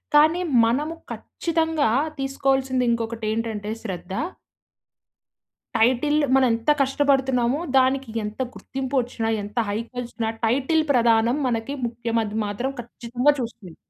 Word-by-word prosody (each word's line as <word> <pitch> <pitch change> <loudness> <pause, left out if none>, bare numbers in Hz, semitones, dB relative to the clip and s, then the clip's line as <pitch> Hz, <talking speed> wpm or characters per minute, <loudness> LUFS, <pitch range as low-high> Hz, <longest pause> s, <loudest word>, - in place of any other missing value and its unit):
కానీ 315 +4 +5 0.2
మనము 295 +8 0 0.2
ఖచ్చితంగా 320 -5 -1 0.3
తీసుకోవాల్సింది 270 -1 +1
ఇంకొకటి 230 -1 -2
ఏంటంటే 220 -2 -3
శ్రద్ధ 185 -3 -6 1.6
టైటిల్ 255 +6 +3 0.2
మనం 265 - +5
ఎంత 230 +6 +1
కష్టపడుతున్నామో, 270 -1 +2 0.2
దానికి 265 -1 +2
ఎంత 210 +3 -6
గుర్తింపోచ్చిన 260 -3 -3 0.2
ఎంత 205 +4 -10
హైకొచ్చిన 235 +2 -4 0.2
టైటిల్ 270 +7 +2
ప్రధానం 235 0 +3
మనకి 235 +3 -2
ముఖ్యమది 230 -2 -2
మాత్రం 225 +7 -2
ఖచ్చితంగా 245 +4 0
చూస్తుంది. 220 -8 -6
245 Hz, 100 wpm, -23 LUFS, 230-270 Hz, 1.6 s, కానీ